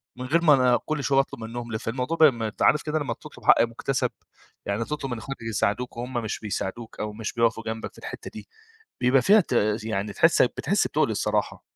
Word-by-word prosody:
من 125 +1 -6
غير 160 +6 +2
ما 155 -3 +7
أنا 125 -3 +4
كل 155 -2 -2
شوية 135 -1 +3
أطلُب 135 - -2
منهم، 120 +1 -6
ل 110 - -2
فالموضوع 125 +9 -3
ب 160 - +4
ما 120 -7 +4
أنت 105 - -9
عارف 150 - +4
كده 155 0 -1
لمّا 135 -6 -2
تطلُب - - -14
حق - - +6
مُكَتسَب، 120 +3 -1 0.5
يعني 100 +3 -1
تطلُب 145 -2 -4
من 120 - -2
إخواتك 135 +4 -7
يساعدوك 115 +2 -1
وهُم 125 +2 -5
مش 115 -3 -3
بيساعدوك 110 +2 -5
أو 105 0 -3
مش 110 0 -5
بيقفوا 115 -1 +1
جنبك 110 0 -5
في - - -21
الحتّة - - -8
دي، - - -10 0.5
بيبقى 125 +1 +4
فيها 205 - +6
ت - - -13 0.3
يعني 105 -2 -3
تحس - - +4
بتحس - - +1
بتُقْل - - +1
الصراحة. - - -1
120 Hz, 215 wpm, -25 LUFS, 110-135 Hz, 0.5 s, ما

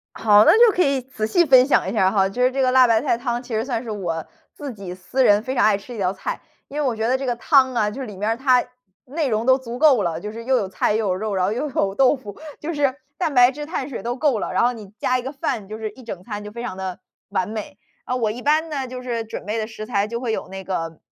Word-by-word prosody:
好， 210 -1 +6
那 - - +7
就 465 -4 +6
可 360 - +4
以 275 -2 +1
仔 245 -4 -4
细 345 +11 +3
分 260 -3 +7
享 230 -9 +2
一 - - -4
下 200 -5 +2
儿 - - +2
哈。 195 -2 +3
就 245 +6 -4
是 255 - +4
这 270 +1 -1
个 255 -1 +3
辣 260 -1 +7
白 225 -1 +3
菜 265 -4 +1
汤， 240 0 -2
其 240 -3 -6
实 220 - 0
算 245 -4 -2
是 230 - -8
我 170 -6 -3 0.3
自 285 -3 -7
己 195 -4 -8
私 185 +9 -1
人 205 -2 +5
非 260 +3 -4
常 - - +3
爱 210 -2 +4
吃 245 +5 -11
的 - - -7
一 210 - -5
道 185 0 +1
菜。 190 - -5 0.3
因 295 +2 -4
为 290 - 0
我 245 - -1
觉 220 +1 -1
得 255 +2 +2
这 270 - -5
个 245 -1 0
汤 260 0 +4
啊， 215 -3 +1
就 255 +6 -7
是 260 - -5
里 205 -3 -9
面 210 +3 -1
儿 225 - 0
它 255 -1 +3 0.4
内 295 +2 -2
容 220 0 0
都 260 0 +5
足 245 -2 -7
够 275 -8 +5
了， 165 -1 -2
就 210 +3 -6
是 230 +1 -8
又 260 +2 +2
有 200 - -1
菜、 190 +2 0
又 220 -1 0
有 185 - +1
肉， 210 +2 -3
然 185 - +1
后 195 - 0
又 290 +5 -2
有 195 -6 -1
豆 270 +3 +4
腐， 210 -7 -10 0.2
就 330 +3 -4
是 285 -3 +1 0.2
蛋 325 -5 -1
白 245 0 +6
质、 295 +2 -7
碳 295 -4 -4
水 250 - -6
都 240 +1 -2
够 265 -6 +1
了。 - - -3
然 - - +2
后 245 - +3
你 215 -5 -10
加 255 - +1
一 - - -3
个 260 +2 -5
饭， 275 -8 -3
就 215 - -6
是 220 -1 -4
一 255 +3 -15
整 190 -6 -7
餐， 210 0 -6
就 210 - -8
非 235 +2 -7
常 240 -6 -5
地 190 -1 -5 0.3
完 185 - -1
美。 215 -1 -6 0.3
啊， 250 - -2
我 225 -4 0
一 240 +3 -7
般 310 +4 +2
呢， 275 -3 -3
就 250 0 -7
是 240 -2 -3
准 220 - -8
备 210 +2 -2
的 215 -1 -2
食 215 -1 -8
材 205 -3 0
就 235 +2 -4
会 235 -3 -2
有 - - -4
那 190 0 -7
个 165 -4 -3
235 Hz, 335 characters per minute, -22 LUFS, 210-260 Hz, 0.4 s, 那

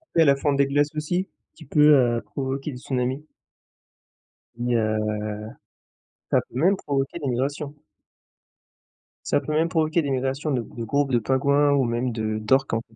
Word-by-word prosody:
Tu 165 - +5
sais - - +6
la 140 -1 +5
fonte 140 0 0
des 140 - +4
glaces 145 +2 +1
aussi, 175 +5 -1 0.3
qui 160 - -14
peut, 150 +2 +5
heu, 120 -4 +3
provoquer 135 +2 -4
des 125 - -8
tsunamis 130 +2 -2 1.3
et 120 - -4
heu, 110 -1 +1 1.3
ça - - +5
peut - - -10
même 185 +7 +4
provoquer 140 +1 -2
des 145 - -3
migrations 140 +4 -2 1.5
ça - - +2
peut - - -5
même 160 +2 +2
provoquer 160 0 +1
des 140 -3 -2
migrations 135 +3 -1
de 130 -4 0
gr - - -13
de 115 - -3
groupes 140 +4 0
de 120 - +3
pingouins 140 +4 +2
ou 140 -1 +3
même 120 +1 -1
de 110 -1 -2
d'orques 130 +6 +2
en 115 - +1
fait. 110 - -24
140 Hz, 180 wpm, -24 LUFS, 125-150 Hz, 1.5 s, sais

